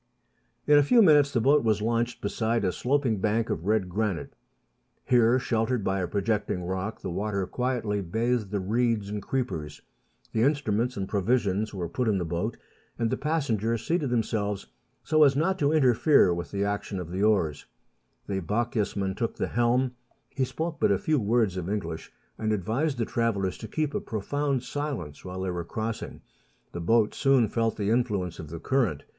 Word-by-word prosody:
In 150 0 +6
a - - +5
few 230 - +5
minutes 145 -5 +5
the 120 - +1
boat 140 +5 +4
was 110 -2 +2
launched 115 +2 -1
beside 110 +1 0
a 90 - +2
sloping 125 -2 0
bank 110 +3 0
of 80 +4 -3
red 105 -3 +2
granite. 100 -1 -2 0.7
Here, 120 0 +4
sheltered 115 -2 0
by 95 0 0
a 90 - -1
projecting 100 -2 -1
rock, 95 +4 -3
the 95 - -4
water 100 +1 -1
quietly 120 -3 -1
bathed 110 +3 -1
the 100 0 -1
reeds 110 +1 0
and 105 0 -4
creepers. 80 - -3 0.5
The 110 - +1
instruments 125 -4 +1
and 95 -1 -2
provisions 105 0 0
were 90 -4 -4
put 115 +9 -2
in 105 -3 +2
the 90 - -2
boat, 90 +8 -2 0.4
and 115 -2 0
the - - +2
passengers 115 -8 -1
seated 160 -5 0
themselves 105 -4 -1 0.4
so 155 -1 +2
as 140 -2 +5
not 185 +6 +1
to 145 -2 +2
interfere 135 - +4
with 85 0 -4
the 100 0 -1
action 100 -1 -2
of 85 -2 -6
the 95 +2 -2
oars. 95 -9 +1 0.6
The 95 -1 -2
Bochjesman 105 -1 -1
took 115 0 -2
the - - -2
helm; 120 +2 +2 0.4
he 135 -1 0
spoke 160 +4 -4
but - - +3
a 100 - +3
few 155 +8 +1
words 110 -3 +1
of 90 0 -3
English, 85 -6 -4 0.3
and 110 -1 0
advised 115 - 0
the 115 - 0
travellers 100 -6 0
to 110 - -7
keep 155 +2 -2
a - - 0
profound 135 +5 -2
silence 140 - -5
while 95 0 -6
they 95 -1 -1
were 90 -1 -3
crossing. 110 +6 -5 0.5
The 85 - -5
boat 110 +5 +3
soon 135 -4 +3
felt 115 0 0
the 105 0 0
influence 105 -8 0
of 80 - -7
the 85 +1 -6
current. 105 - 0
110 Hz, 185 wpm, -27 LUFS, 100-125 Hz, 0.7 s, In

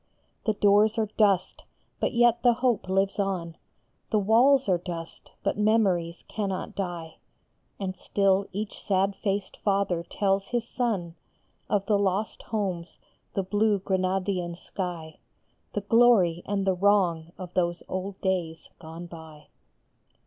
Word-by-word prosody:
The 215 - +3
doors 205 +2 +4
are 220 - +2
dust, 200 -4 +2 0.4
but - - 0
yet 240 -1 +3
the 245 -1 +5
hope 235 -5 0
lives 195 +2 +1
on; 180 -4 -2 0.5
The 220 - +2
walls 240 +6 +4
are 180 -3 +2
dust, 170 -2 -7
but - - -1
memories 195 -6 +2
cannot 195 -3 -3
die; 175 -4 -5 0.6
.And 190 -2 -3
still 195 0 +1
each 210 +2 -5
sad 195 0 +1
faced 200 -1 -2
father 195 -4 0
tells 195 +2 0
his 235 -1 -2
son 210 -11 -2 0.6
Of 200 -2 +1
the 205 -2 +2
lost 200 +2 -1
homes, 185 -6 -3 0.4
the 195 - +1
blue 205 +2 +2
Granadian 185 -2 -1
sky, 170 -5 -6 0.5
The 205 - -1
glory 205 -6 +4
and 195 -1 -1
the 190 - +3
wrong 180 -4 +2
of 180 -2 -8
those 175 -1 0
old 185 +1 -4
days 175 -4 -2
gone 165 +1 -9
by. 160 -3 -12
195 Hz, 135 wpm, -27 LUFS, 175-210 Hz, 0.6 s, the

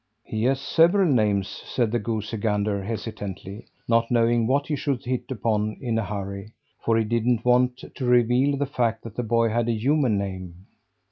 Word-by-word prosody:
"He 110 +1 -3
has 135 +1 +2
several 170 +7 +3
names," 105 -4 +2
said 120 -4 -2
the 120 - +1
goosey 110 0 -3
gander 105 -1 0
hesitantly, 100 -2 -6 0.2
not 115 0 +2
knowing 115 -1 +2
what 140 +3 +1
he 150 - -1
should 135 -3 -2
hit 125 0 -3
upon 110 -4 -1
in 120 -4 -2
a - - -1
hurry, 100 +1 -6 0.3
for 115 -1 +2
he 115 - +2
didn't 115 +1 0
want 125 0 +2
to 130 - -4
reveal 125 +3 +3
the 145 - 0
fact 115 -5 -1
that 115 -2 -9
the - - -1
boy 115 0 +2
had 120 +1 0
a - - +2
human 125 0 +1
name. 95 -2 -6
115 Hz, 185 wpm, -24 LUFS, 105-125 Hz, 0.3 s, several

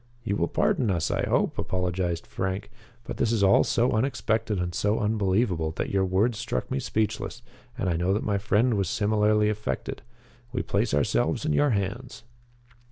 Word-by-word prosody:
"You 100 -3 -1
will 85 - +1
pardon 120 +5 +1
us, 85 -4 0
I - - -1
hope," - - +1
apologized 90 -2 -1
Frank, 95 +2 -4 0.3
"but - - -6
this 115 - +1
is 110 -3 +1
all 95 0 +6
so 120 +2 +1
unexpected 110 -3 0
and 90 -1 -2
so 105 +4 +1
unbelievable 100 -5 +1
that - - -3
your 95 -1 +2
words 105 +5 +1
struck 120 - -3
me 135 - 0
speechless. 110 -4 -2 0.3
And - - -1
I 85 -2 +1
know 90 +3 +1
that 105 - -1
my 100 -1 0
friend 110 +4 +2
was 100 -3 0
similarly 105 -1 +2
affected 105 0 -3 0.5
We 125 - -2
place 105 -3 0
ourselves 65 -4 +1
in - - +1
your 145 - +3
hands." 110 +3 -3
105 Hz, 175 wpm, -26 LUFS, 95-115 Hz, 0.5 s, all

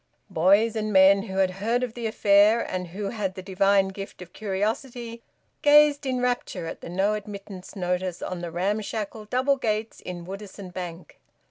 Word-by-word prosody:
Boys 200 +7 +4
and 215 -1 -1
men 195 0 +6
who 190 -2 -6
had 190 -1 +3
heard 225 +6 -1
of 245 -3 -3
the 235 -1 -3
affair, 210 +1 +5
and 180 -1 -4
who 195 +4 -4
had 195 -4 -3
the 185 - -7
divine 195 +1 +3
gift 195 +1 -8
of 180 -1 -11
curiosity, 230 +4 -3 0.4
gazed 295 -1 +5
in 255 -1 0
rapture 245 -8 -1
at 165 - -7
the - - -8
`No 195 +4 +1
Admittance' 200 -2 -8
notice 180 -1 -2
on 180 -1 -4
the 175 - -4
ramshackle 210 +4 -3
double 260 +5 +1
gates 220 -2 -2
in 175 -1 -7
Woodisun 195 -1 -8
Bank. 175 -2 -7
200 Hz, 170 wpm, -25 LUFS, 185-225 Hz, 0.4 s, men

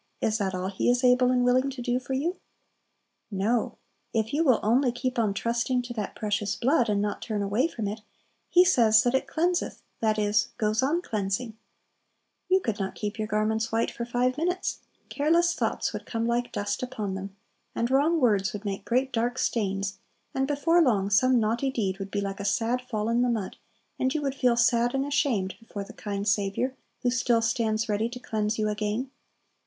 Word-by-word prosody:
is 220 0 0
that 190 -2 -1
all 185 +1 -2
He 195 - 0
is 245 +1 +2
able 250 0 +5
and 250 -1 +2
willing 255 +2 +3
to 270 -1 -8
do 245 0 0
for 255 +1 -5
you? 325 +8 -1 0.9
No; 215 +4 0 0.4
if 220 +2 0
you 310 +3 +2
will 255 -7 +4
only 245 +4 +3
keep 250 +1 -2
on 215 -3 +2
trusting 235 +4 0
to 240 0 -6
that 215 -4 -4
precious 210 -1 -1
blood, 255 -2 +2
and 205 -1 +1
not 210 - -3
turn 210 -3 -2
away 210 +9 +1
from 225 -10 -4
it, 210 +2 -5 0.5
He 360 +1 +6
says 225 -10 +5
that 245 - +1
it 265 - +1
cleanseth, 350 +2 -1 0.2
that 220 -1 +1
is, 210 0 +1
goes 215 0 +1
on 315 +7 +1
cleansing. 215 - -2 0.9
You 375 +1 +4
could 225 - -2
not 195 -1 -3
keep 210 +1 -4
your 215 - -1
garments 220 +1 0
white 225 +1 +1
for 235 - -5
five 245 +3 0
minutes; 355 +3 -1 0.3
careless 335 +4 +2
thoughts - - -1
would - - -6
come 230 -1 -2
like 240 +1 0
dust 205 0 -2
upon 225 -6 -3
them, 195 +1 -6 0.4
and 235 +2 -1
wrong 300 +5 +3
words 210 -5 +2
would 210 0 -7
make 200 -1 -3
great 260 +2 0
dark 240 +2 0
stains 195 -4 -1 0.3
and 265 0 0
before 315 +4 +3
long 205 -9 +2
some 255 +5 +4
naughty 230 +5 0
deed 200 -7 -2
would 195 0 -5
be 200 0 -2
like 195 0 -4
a - - -4
sad 230 +5 0
fall 220 -4 -3
in 235 +1 +2
the 250 - +2
mud, 220 -5 -2 0.4
and 260 +3 +1
you 300 - -1
would 275 -1 -1
feel 250 -3 +2
sad 240 +1 +3
and 270 0 0
ashamed 275 -10 0
before 215 -3 -7
the - - -12
kind 200 -1 -4
Saviour 205 +5 0 0.3
who 245 - +2
still 240 -2 +2
stands 225 -1 0
ready 215 +2 0
to 250 +1 -8
cleanse 215 -2 -2
you 215 -1 0
again. 210 +5 -2
230 Hz, 200 wpm, -27 LUFS, 210-255 Hz, 0.9 s, He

